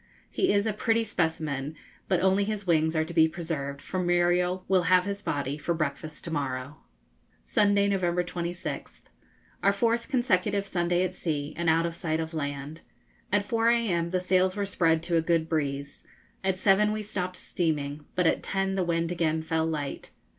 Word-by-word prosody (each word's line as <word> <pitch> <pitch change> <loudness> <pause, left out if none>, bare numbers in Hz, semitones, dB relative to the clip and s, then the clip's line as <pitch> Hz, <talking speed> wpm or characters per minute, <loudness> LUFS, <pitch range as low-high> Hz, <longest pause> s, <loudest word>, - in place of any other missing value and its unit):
He 375 - +2
is 200 +1 +2
a 220 - 0
pretty 225 +2 +1
specimen, 160 -7 -2 0.3
but 185 - +2
only 190 +2 +3
his 205 -1 -3
wings 160 -2 +2
are 155 0 +2
to 170 - -8
be 160 -1 +6
preserved, 155 -4 -4
for 185 - -3
Muriel 180 +1 +2
will 190 -1 +4
have 185 0 +5
his 200 0 -3
body 145 -2 -2
for 170 +3 -1
breakfast 155 0 -4
to 170 - -6
morrow. 140 -1 -3 0.7
Sunday, 205 -1 +3
November 180 -3 +1
26th. 175 0 -5 0.6
Our 200 - +4
fourth 230 +3 +1
consecutive 205 -7 +1
Sunday 175 -1 +1
at 185 0 -2
sea, 150 -5 -3
and 170 0 0
out 165 +1 +3
of 170 - -2
sight 160 -2 -1
of 160 0 -4
land. 145 +1 -4 0.5
At 205 0 +2
4 230 +2 +2
a.m. 195 -8 +1
the 185 +1 0
sails 185 +1 +2
were 205 -1 -1
spread 165 -4 +2
to 170 0 +1
a - - +3
good 165 -1 +1
breeze. 140 -3 -2 0.4
At 190 -1 +1
7 200 +2 +4
we 215 0 -2
stopped 185 -3 -4
steaming, 150 -3 -2
but 180 - +2
at - - +3
10 195 0 -1
the 190 -1 +1
wind 170 -1 0
again 160 -2 0
fell 160 0 0
light. 150 -3 -4
175 Hz, 180 wpm, -28 LUFS, 160-195 Hz, 0.7 s, be